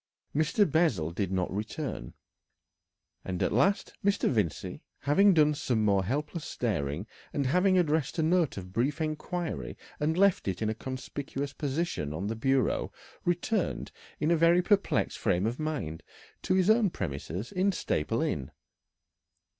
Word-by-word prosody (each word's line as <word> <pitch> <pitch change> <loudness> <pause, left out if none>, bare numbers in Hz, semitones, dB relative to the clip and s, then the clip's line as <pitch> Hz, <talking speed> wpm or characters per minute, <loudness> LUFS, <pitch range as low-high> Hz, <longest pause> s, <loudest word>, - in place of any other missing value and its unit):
Mr. 160 +8 +3
Bessel 140 - +2
did 95 +2 -2
not 95 -1 -1
return, 105 - -4 1.1
and 90 -2 -2
at - - +1
last 200 +1 +2
Mr. 200 0 +2
Vincey, 105 - -1 0.2
having 195 +9 +5
done 150 -4 +4
some 125 -7 0
more 100 -2 +3
helpless 150 - -2
staring, 85 - -2 0.3
and 140 - 0
having 180 +7 +3
addressed 160 -3 +1
a 160 - +2
note 165 - +2
of 90 -1 -7
brief 135 - 0
inquiry 160 +2 -3 0.2
and 160 +3 +1
left 200 - +3
it 95 -2 -1
in 110 -1 0
a - - -1
conspicuous 135 +3 -5
position 140 - -2
on 85 +6 -3
the 110 +2 -2
bureau, 130 +1 +1 0.3
returned 175 +3 0 0.3
in 155 +2 +1
a - - +5
very 170 +2 +4
perplexed 200 +1 +1
frame 90 +3 +1
of 115 +3 -2
mind 145 - -3 0.4
to 185 - +1
his 185 -1 +3
own 220 -1 +5
premises 85 - -4
in 190 +2 +2
Staple 75 - -1
Inn. 65 - -2
145 Hz, 150 wpm, -29 LUFS, -, 1.1 s, having